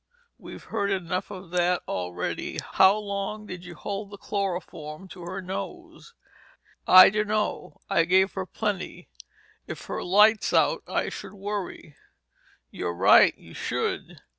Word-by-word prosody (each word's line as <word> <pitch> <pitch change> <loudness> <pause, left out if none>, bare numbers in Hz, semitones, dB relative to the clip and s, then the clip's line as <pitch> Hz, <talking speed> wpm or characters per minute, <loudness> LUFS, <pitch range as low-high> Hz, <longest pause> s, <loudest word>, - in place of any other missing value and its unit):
We've - - -10
heard 200 - -2
enough 185 -1 -2
of 185 -3 -10
that 180 0 +1
already. 90 -1 -4
How 190 +2 +6
long 205 +1 -4
did 180 -3 -8
you 175 -1 -10
hold 200 +5 -5
the 205 - -10
chloroform 185 -5 -4
to 180 - -11
her 185 +2 -5
nose?" 335 - -7 0.7
"I 185 +1 +10
dunno. 210 0 -2
I 165 - +2
gave 190 +3 +3
her 190 -1 -4
plenty. 205 - -4 0.6
If - - -7
her - - -4
light's 210 +4 +4
out, - - +3
I - - -1
should - - -8
worry." 200 -6 -6 0.7
"You're 85 - -4
right, 95 +2 +6
you - - -15
should. - - -3
190 Hz, 140 wpm, -26 LUFS, 180-205 Hz, 0.7 s, I